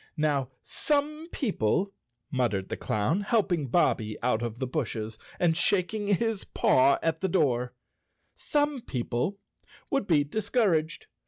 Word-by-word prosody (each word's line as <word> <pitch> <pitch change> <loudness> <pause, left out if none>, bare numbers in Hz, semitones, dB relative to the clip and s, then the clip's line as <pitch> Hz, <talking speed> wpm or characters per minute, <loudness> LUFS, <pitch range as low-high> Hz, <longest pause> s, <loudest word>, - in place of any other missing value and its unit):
"Now 145 -4 +1
some 300 +2 -1
people," 195 - 0 0.4
muttered 110 -7 0
the - - -2
clown, 110 - 0
helping 195 - +1
Bobbie 110 -7 +1
out 120 -2 +1
of 120 -1 -4
the 130 - -2
brushes 115 -5 -3 0.2
and 170 -2 +3
shaking 200 +4 +2
his 220 +1 +1
paw 135 +2 +3
at 160 0 0
the 190 - 0
door, 125 -8 +1 0.6
"some 290 -3 0
people 125 - -2 0.5
would 275 -7 0
be 150 -4 +4
discouraged. 185 - 0
160 Hz, 130 wpm, -28 LUFS, 125-205 Hz, 0.6 s, be